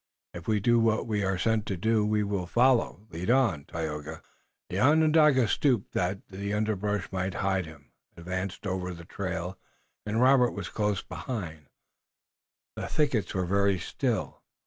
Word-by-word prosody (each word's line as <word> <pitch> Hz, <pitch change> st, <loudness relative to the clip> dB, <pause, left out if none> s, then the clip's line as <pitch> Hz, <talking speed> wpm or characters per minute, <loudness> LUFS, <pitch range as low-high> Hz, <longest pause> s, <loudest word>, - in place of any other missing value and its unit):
"If 85 Hz, -1 st, -9 dB
we 110 Hz, -1 st, +2 dB
do 120 Hz, +3 st, +3 dB
what 115 Hz, -1 st, +2 dB
we 105 Hz, -3 st, -1 dB
are 95 Hz, -1 st, 0 dB
sent 110 Hz, +2 st, 0 dB
to 95 Hz, -, -2 dB
do 110 Hz, +4 st, +2 dB
we 105 Hz, 0 st, +1 dB
will 100 Hz, -3 st, -2 dB
follow." 120 Hz, -2 st, +2 dB
"Lead 85 Hz, +5 st, -4 dB
on, 115 Hz, -, +2 dB
Tayoga." 80 Hz, -2 st, -5 dB, 0.5 s
The 95 Hz, -, -1 dB
Onondaga 150 Hz, -2 st, +5 dB
stooped 125 Hz, -3 st, +1 dB
that 95 Hz, +2 st, -2 dB
the 100 Hz, +2 st, -4 dB
underbrush 105 Hz, -2 st, -1 dB
might 95 Hz, -1 st, -2 dB
hide 95 Hz, -3 st, 0 dB
him, 75 Hz, -2 st, -14 dB, 0.3 s
advanced 90 Hz, +3 st, -4 dB
over 90 Hz, -2 st, -3 dB
the 85 Hz, 0 st, -11 dB
trail, 90 Hz, 0 st, -4 dB, 0.4 s
and 105 Hz, +2 st, -1 dB
Robert 125 Hz, -1 st, +5 dB
was 100 Hz, -3 st, -5 dB
close 105 Hz, -3 st, -1 dB
behind. 85 Hz, -, -6 dB, 1.1 s
The -, -, -4 dB
thickets 135 Hz, -11 st, 0 dB
were 95 Hz, -1 st, 0 dB
very 100 Hz, +1 st, +2 dB
still. -, -, -2 dB
100 Hz, 155 wpm, -28 LUFS, 90-110 Hz, 1.1 s, Onondaga